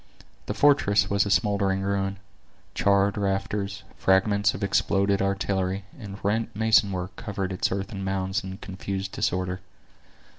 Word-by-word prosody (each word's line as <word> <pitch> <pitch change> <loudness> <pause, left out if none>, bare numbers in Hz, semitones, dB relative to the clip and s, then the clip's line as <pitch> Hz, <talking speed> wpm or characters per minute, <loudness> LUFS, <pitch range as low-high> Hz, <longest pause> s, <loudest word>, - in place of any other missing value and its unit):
The - - -2
fortress 140 -10 +3
was 100 0 +2
a - - -2
smoldering 100 -2 +1
ruin; 100 0 -1 0.6
charred 100 0 +2
rafters, 100 0 -2
fragments 100 +2 +3
of 95 - -5
exploded 100 0 +2
artillery, 95 0 -1
and 105 -8 -8
rent 110 +2 0
mason 110 -2 +4
work 90 0 -4
covering 100 -4 -4
its 95 - -1
earthen 100 +1 -4
mounds 95 0 -1
in 95 0 -6
confused 95 0 -5
disorder. 90 0 -1
100 Hz, 135 wpm, -26 LUFS, 95-100 Hz, 0.6 s, mason